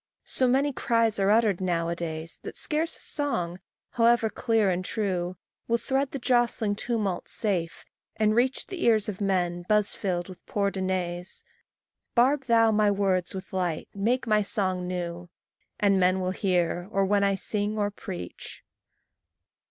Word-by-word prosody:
So 260 - +2
many 270 +3 +2
cries 230 -3 +1
are 195 0 +3
uttered 210 -4 +3
now 170 -2 0
a 170 - -1
days, 165 -1 -5
That - - -7
scarce 320 +1 0
a - - -12
song, 180 - -2 0.3
however 235 -2 +3
clear 225 -5 +1
and 180 +1 -1
true, 185 -3 -2 0.3
Will 235 - +2
thread 270 +3 -1
the 275 - -5
jostling 240 -4 +1
tumult 215 -5 -2
safe, 180 -6 -1 0.3
and 215 0 +2
reach 255 +3 +1
The 380 -3 -6
ears 220 -3 +4
of 210 -1 -5
men 175 -3 0
buz 210 -1 +3
filled 175 -3 -2
with 185 -2 -12
poor 200 -1 0
denays: 185 -1 -3 0.7
Barb 265 +3 +3
thou 225 -1 +5
my 210 -1 +3
words 195 -3 0
with 190 0 -8
light, 180 -4 -2
make 230 +6 0
my 215 -2 +3
song 185 -3 -1
new, 175 -1 -4 0.5
And 200 -2 +3
men 185 +1 +3
will 185 0 -1
hear, 180 -2 0
or 195 -2 +1
when 200 +1 +2
I 200 0 +2
sing 210 +2 -1
or 205 -1 0
preach. 90 - -8
200 Hz, 160 wpm, -27 LUFS, 180-230 Hz, 0.7 s, thou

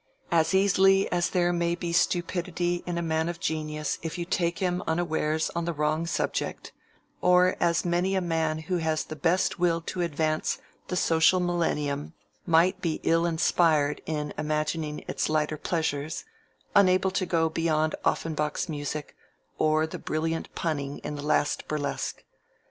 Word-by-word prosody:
As 165 +2 +3
easily 195 0 +4
as 175 0 +1
there 175 -1 +2
may 170 0 +1
be 170 -1 -4
stupidity 175 0 0
in 175 -1 -2
a 170 - -1
man 160 0 0
of 170 -1 -5
genius 155 -1 -2
if 165 +1 -4
you 175 - -3
take 170 -1 0
him 180 -1 0
unawares 160 -2 0
on 170 0 -2
the 170 - -1
wrong 155 +2 0
subject, - - -2 0.5
or 180 0 +5
as 170 0 +2
many 175 +2 +1
a - - +3
man 160 -2 0
who 185 -1 0
has 160 -2 0
the 155 - -7
best 165 +4 +1
will 170 -1 +2
to 180 +2 -4
advance 155 -1 0 0.3
the 180 - -3
social 165 +1 +4
millennium 155 -5 -1 0.3
might 170 +2 +3
be 165 -3 -1
ill 165 +1 +3
inspired 160 -3 +2
in 150 -2 -2
imagining 155 0 -2
its - - -1
lighter 155 0 +1
pleasures; 155 - -2 0.5
unable 185 -1 +5
to 185 -1 -1
go 165 -2 +2
beyond 160 -1 0
Offenbach's 150 0 -1
music, 150 -1 -5 0.4
or 155 0 +3
the 160 - -7
brilliant 160 +1 -2
punning 145 -4 -2
in - - -4
the 145 - -5
last 145 0 0
burlesque. 145 -2 -3
165 Hz, 155 wpm, -27 LUFS, 155-175 Hz, 0.5 s, or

